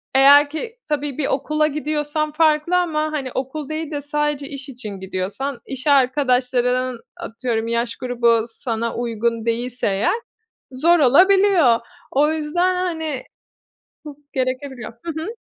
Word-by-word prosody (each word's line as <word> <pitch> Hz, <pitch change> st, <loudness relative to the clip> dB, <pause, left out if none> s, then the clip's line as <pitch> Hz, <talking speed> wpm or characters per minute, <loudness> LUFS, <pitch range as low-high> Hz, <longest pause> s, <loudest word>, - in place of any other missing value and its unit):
eğer 285 Hz, +2 st, +7 dB
ki 450 Hz, +11 st, -6 dB
tabii 290 Hz, -2 st, -2 dB
bir 300 Hz, -, 0 dB
okula 305 Hz, +3 st, +1 dB
gidiyorsan 305 Hz, 0 st, -2 dB
farklı 310 Hz, +2 st, +2 dB
ama, 310 Hz, -3 st, 0 dB
hani, 275 Hz, -5 st, -3 dB
okul 270 Hz, +3 st, -4 dB
değil 310 Hz, 0 st, -4 dB
de 290 Hz, -1 st, -3 dB
sadece 295 Hz, -1 st, -2 dB
iş 275 Hz, -1 st, -7 dB
için 245 Hz, -5 st, -8 dB
gidiyorsan, 195 Hz, +8 st, -4 dB
iş 265 Hz, +1 st, -6 dB
arkadaşlarının 255 Hz, -2 st, +2 dB, 0.2 s
atıyorum 230 Hz, -1 st, -3 dB
yaş 235 Hz, 0 st, -1 dB
grubu 235 Hz, -2 st, +2 dB
sana 230 Hz, 0 st, -3 dB
uygun 230 Hz, -1 st, -1 dB
değilse 240 Hz, +2 st, -1 dB
eğer, 200 Hz, -, +1 dB, 0.6 s
zor 330 Hz, +7 st, +3 dB
olabiliyor. 350 Hz, -, +5 dB, 0.3 s
O 295 Hz, +3 st, +3 dB
yüzden, 345 Hz, +4 st, 0 dB
hani, 320 Hz, -7 st, -2 dB, 0.8 s
çok 295 Hz, -2 st, -9 dB, 0.2 s
gerekebiliyor. 255 Hz, -3 st, -3 dB
Hı 335 Hz, -, -2 dB
hı. -, -, -5 dB
275 Hz, 130 wpm, -21 LUFS, 245-305 Hz, 0.8 s, eğer